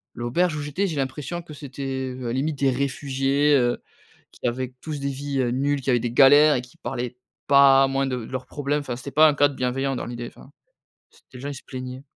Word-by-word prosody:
L'auberge 155 +8 0
où - - -3
j'étais, 150 +8 -1
j'ai 160 - -4
l'impression 140 +5 -3
que 155 - -11
c'était 135 -2 -5 0.2
limite 145 +2 -1
des 135 -1 +3
réfugiés, 140 +2 +1
heu, 120 -2 +1 0.5
qui - - -5
avaient 125 +1 -3
tous 150 -3 -5
des 140 - -2
vies, 140 0 -3
heu, 120 -2 +1
nulles, 140 +2 0
qui 130 - -1
avaient 120 - +4
des 120 0 -3
galères 145 +3 +7
et 125 - -2
qui 125 - -17
parlaient 125 -1 -5 0.3
pas, 135 -1 +6
moins 135 0 0
de 130 -1 -2
de - - -13
leurs 130 -1 -4
problèmes. 145 0 -2
Enfin 130 -4 -4
c'était 140 +2 -8
pas 155 +1 +7
un 145 - +2
cadre 145 -1 +2
bienveillant, 135 +1 -1
dans - - -4
l'idée, 120 0 -6
enfin, 135 - -16 0.6
c'était - - -25
les - - -10
gens, 140 - -5
ils - - -5
se 135 - -11
plaignaient. 130 0 -7
135 Hz, 225 wpm, -24 LUFS, 130-145 Hz, 0.6 s, galères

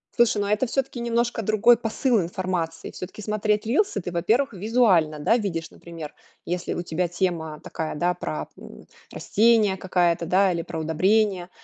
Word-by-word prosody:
Слушай, 235 -3 +3
но 200 - -1
это 215 +4 +1
всё-таки 265 0 -2
немножко 235 0 0
другой 215 +3 +4
посыл 230 0 0
информации. 170 -2 -3
Всё-таки 195 +3 -8
смотреть 210 0 0
рилс 290 - +1
ты, 180 -3 -4
во-первых, 225 +10 +1
визуально, 190 -7 +2
да, 190 +11 +2
видишь, 170 -7 -3
например, 165 -3 -9 0.3
если 180 0 -3
у 175 - -3
тебя 175 +1 -1
тема 170 -3 -2
такая, 160 -1 -5
да, 175 +3 +1
про, 75 - -5
м, - - -13 0.3
растения 220 -2 +3
какая-то, 175 -3 0
да, 190 +2 +3
или 170 -1 -2
про 165 0 -6
удобрения. 185 +3 +1
190 Hz, 160 wpm, -24 LUFS, 170-220 Hz, 0.3 s, другой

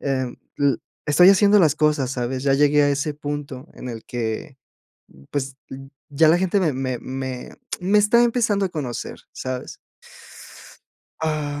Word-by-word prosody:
eh, 130 -2 -1 0.3
l 140 -1 +3 0.3
estoy 180 +5 +6
haciendo 200 +1 +6
las 160 -6 +4
cosas, 150 -4 +1
¿sabes?, 130 +1 -3
ya 135 -1 +3
llegué 145 +1 +4
a 145 - +3
ese 145 +2 -1
punto 145 -1 -6
en 125 - -7
el 115 -1 -8
que, 120 +4 -4 0.7
pues 140 -1 -3 0.5
ya 155 +2 +3
la 170 - +5
gente 190 +2 +1
me 160 -5 +1
me 130 -2 -3
me 130 -1 -6 0.3
me 195 +4 +2
está 215 +3 +4
empezando 230 -4 +2
a 190 - 0
conocer, 135 -8 -5
¿sabes? 130 -1 -5 1.4
Ah, 150 -2 -2
145 Hz, 150 wpm, -22 LUFS, 130-170 Hz, 1.4 s, estoy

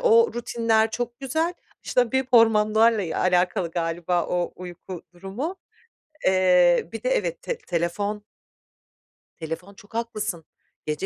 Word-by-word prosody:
o 465 -1 +5
rutinler 230 -2 +1
çok 240 +1 -4
güzel, 320 +6 -1 0.3
işte, 245 -2 +1
bir 265 -1 +1
hormonlarla, 220 -1 +5
eee, 165 -3 -4
alakalı 180 -1 +1
galiba 170 +1 -1
o 175 -1 -1
uyku 180 0 -9
durumu. 200 - -5 0.7
Eee, 180 -2 +4
bir 225 0 -7
de, 255 - +1
evet, 175 -9 -1
te - - -3
telefon 200 +5 -2 1.2
telefon, 165 +5 -6
çok 205 +2 -18
haklısın. 215 -7 -3 0.4
Gece 150 0 -2
205 Hz, 125 wpm, -24 LUFS, 175-235 Hz, 1.2 s, o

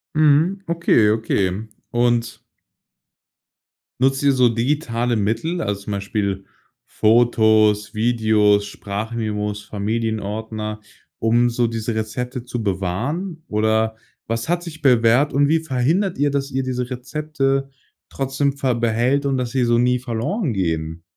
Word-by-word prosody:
Mhm, 155 +6 +3
okay, 165 -10 +3
okay. 105 -2 0 0.3
Und 120 -1 0 1.6
nutzt 135 +1 +2
ihr 140 - +5
so 125 -2 +4
digitale 120 -1 0
Mittel, 115 - -1
also, 100 -1 -2
zum 105 - -6
Beispiel 100 -1 -2 0.4
Fotos, 110 -2 +3
Videos, 110 -2 +2
Sprachmemos, 105 0 -4
Familienordner, 110 0 -3 0.4
um 120 +2 +3
so 120 0 +1
diese 115 0 -3
Rezepte 125 +3 -4
zu 120 -2 -4
bewahren? 125 - -3
Oder, 110 +1 +1 0.3
was 115 +6 -3
hat 175 0 0
sich 160 -3 -9
bewährt 125 +1 +4
und 145 +1 +3
wie 160 +2 +3
verhindert 160 +6 0
ihr, 145 +1 +1
dass 140 0 -1
ihr 135 0 -1
diese 125 -1 -3
Rezepte 135 +1 -2 0.4
trotzdem 135 +1 -1
ver 135 -3 0
behält 120 +4 +1
und 135 -1 +1
dass 125 -2 -2
sie 130 -2 +1
so 120 0 +3
nie 125 +1 +2
verloren 125 - -2
gehen? 80 -3 -2
120 Hz, 130 wpm, -21 LUFS, 110-135 Hz, 1.6 s, ihr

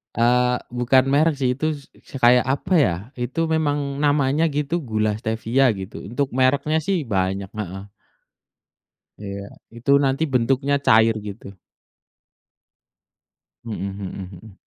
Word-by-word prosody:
Eee, 125 +1 +2
bukan 125 +2 +2
merek 150 +3 +3
sih, 125 -1 +1
itu 155 +3 -1
s 145 -2 -9 0.2
s - - -19
kayak 125 0 +5
apa 140 +8 -1
ya, 115 - +3 0.3
itu 130 +6 -4
memang 155 -2 +1 0.3
namanya 145 +1 +2
gitu, 150 +3 -1
gula 110 -3 -1
stevia 115 +4 0 0.2
gitu, 95 +2 -8
untuk 140 +3 0
mereknya 140 +4 +2
sih 195 +1 0
banyak 95 -1 -1
heeh. 95 -1 -6 1.3
Iya. 100 -1 -6 0.3
Itu 120 +4 -1
nanti 135 +3 +1
bentuknya 135 +3 +2
cair 110 0 +5
gitu. 100 -1 -8 2.1
Mhm 110 -4 -5
mhm 95 -1 -7
mhm. 110 -3 -15
125 Hz, 125 wpm, -22 LUFS, 110-140 Hz, 2.1 s, kayak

